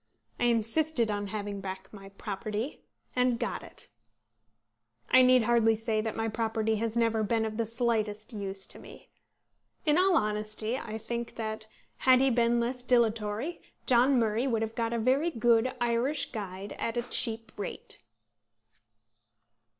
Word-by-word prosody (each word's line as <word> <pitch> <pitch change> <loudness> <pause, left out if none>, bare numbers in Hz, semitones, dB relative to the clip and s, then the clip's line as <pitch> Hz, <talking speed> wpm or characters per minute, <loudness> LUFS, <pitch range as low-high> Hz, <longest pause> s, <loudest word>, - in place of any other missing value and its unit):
I - - +2
insisted 235 +2 +2
on 205 0 -2
having 205 -1 -4
back 190 +1 -7
my 195 -1 -10
property, 210 +5 -5 0.3
and 250 -1 +2
got - - -3
it. - - -8 1.2
I 255 - +8
need 255 -1 +6
hardly 225 -1 +4
say 220 0 -1
that 220 0 -3
my 225 0 -1
property 220 0 0
has 230 +1 -2
never 225 -1 +2
been 220 +1 +1
of 215 -1 -4
the 230 -2 0
slightest 225 -2 -1
use 195 -2 -4
to - - -6
me. - - -13 0.8
In 305 +2 +4
all 370 0 +4
honesty 215 +1 -1
I 225 -4 -5
think 235 +1 -5
that 220 -1 -5 0.3
had 255 -1 +5
he 270 0 +3
been 235 0 +3
less 245 +2 -1
dilatory, 230 +3 +1 0.2
John 255 +2 +5
Murray 225 +2 +1
would 225 -3 +1
have 220 0 -4
got 230 0 -1
a 235 - 0
very 260 +8 +2
good 235 -2 +3
Irish 240 +5 0
Guide 200 -3 -6
at 230 +1 -2
a 240 - 0
cheap 225 -2 -1
rate. 205 - 0
225 Hz, 155 wpm, -29 LUFS, 215-240 Hz, 1.2 s, I